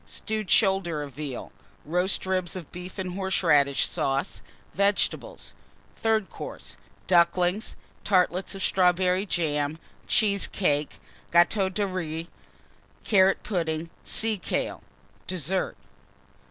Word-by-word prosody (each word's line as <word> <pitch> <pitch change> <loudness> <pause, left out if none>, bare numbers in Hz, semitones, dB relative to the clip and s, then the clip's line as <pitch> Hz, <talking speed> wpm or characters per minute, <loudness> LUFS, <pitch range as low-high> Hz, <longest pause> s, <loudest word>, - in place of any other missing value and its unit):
Stewed 215 -3 -4
Shoulder 190 -7 +3
of 140 -2 -9
Veal. 140 -2 -6 0.3
Roast 180 +5 0
Ribs 185 -2 -1
of 175 -5 -8
Beef 180 +2 -8
and 185 -2 -3
Horseradish 165 -7 +2
Sauce. 135 +6 -1 0.3
Vegetables. 200 +1 0 0.4
THIRD 220 -3 0
COURSE. - - -8 0.3
Ducklings. 180 +3 +2 0.3
Tartlets 185 0 +1
of 195 - -4
Strawberry 185 +1 +2
Jam. 150 -4 0 0.3
Cheesecakes. 195 -7 +1 0.4
Gateau 190 +3 +4
de 205 +2 -1
Riz. 165 -4 -4 0.8
Carrot 195 -2 +4
Pudding. 165 -4 -2
Sea 220 -2 +1
kale. - - -2 0.5
DESSERT. 185 +1 -1
180 Hz, 100 wpm, -26 LUFS, 165-195 Hz, 0.8 s, Gateau